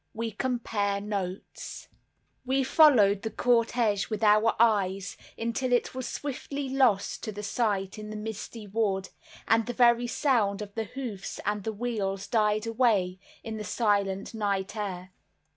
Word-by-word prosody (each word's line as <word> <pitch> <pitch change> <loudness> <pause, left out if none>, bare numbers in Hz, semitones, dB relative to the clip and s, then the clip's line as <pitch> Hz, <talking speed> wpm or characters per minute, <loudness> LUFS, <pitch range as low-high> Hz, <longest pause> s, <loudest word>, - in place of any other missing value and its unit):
We 225 0 -2
Compare 215 -4 -1
Notes 200 -2 -5 0.6
We 265 +1 +1
followed 240 -9 +5
the 220 - -3
cortege 230 -3 +1
with 215 0 -3
our 215 +1 +5
eyes 195 -4 +2 0.2
until 235 +3 -2
it 245 - +2
was 255 -1 -4
swiftly 280 0 -4
lost 250 -7 +2
to 210 -1 -5
sight 205 -2 -1
in 210 0 -7
the 215 - -6
misty 215 +1 -6
wood; 195 -2 -1 0.4
and 225 +1 +3
the 245 - -2
very 240 0 +4
sound 220 -6 +1
of 200 -1 -11
the 225 0 -2
hoofs 220 -4 -6
and 205 0 -1
the 220 - -2
wheels 200 -4 -2
died 215 -1 +1
away 220 -6 +1 0.2
in 220 -1 -5
the 215 - -5
silent 200 -2 0
night 200 -2 -1
air. 185 -3 -4
215 Hz, 145 wpm, -28 LUFS, 200-235 Hz, 0.6 s, followed